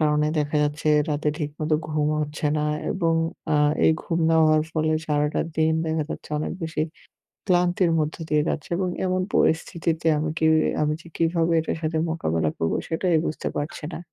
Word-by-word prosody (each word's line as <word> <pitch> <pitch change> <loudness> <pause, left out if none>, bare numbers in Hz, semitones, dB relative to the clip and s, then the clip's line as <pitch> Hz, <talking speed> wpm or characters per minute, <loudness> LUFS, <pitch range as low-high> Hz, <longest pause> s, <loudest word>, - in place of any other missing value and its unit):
কারণে 150 -1 +2
দেখা 150 0 0
যাচ্ছে 150 +1 -1 0.2
রাতে 150 0 0
ঠিকমতো 155 0 -2
ঘুমও 150 0 0
হচ্ছে 150 0 -3
না 150 - 0 0.3
এবং 165 -3 +1 0.4
আ - - +3 0.3
এই - - +6
ঘুম 165 - -2
না 165 - +3
হওয়ার 155 0 +4
ফলে 155 0 +1 0.2
সারাটা 150 0 +1 0.2
দিন 160 0 +3
দেখা 160 0 0
যাচ্ছে - - -6
অনেক 155 - -3
বেশি 160 -1 -3 0.7
ক্লান্তির 180 -1 +2
মধ্য 155 0 -1
দিয়ে 150 -1 +2
যাচ্ছে। 150 - -3
এবং 185 0 0 0.2
এমন 185 0 +1
পরিস্থিতিতে 165 0 +1
আমি 155 +1 -1
কি - - 0 0.4
আমি 150 0 +1
যে - - -17
কীভাবে 165 0 +1
এটার 160 - -3
সাথে 160 0 -1
মোকাবেলা 80 - 0
করবো? 80 - 0
সেটাই 165 +1 +1
বুঝতে 155 - -3
পারছি 150 +1 -4
না। - - -5
155 Hz, 175 wpm, -24 LUFS, 150-165 Hz, 0.7 s, এই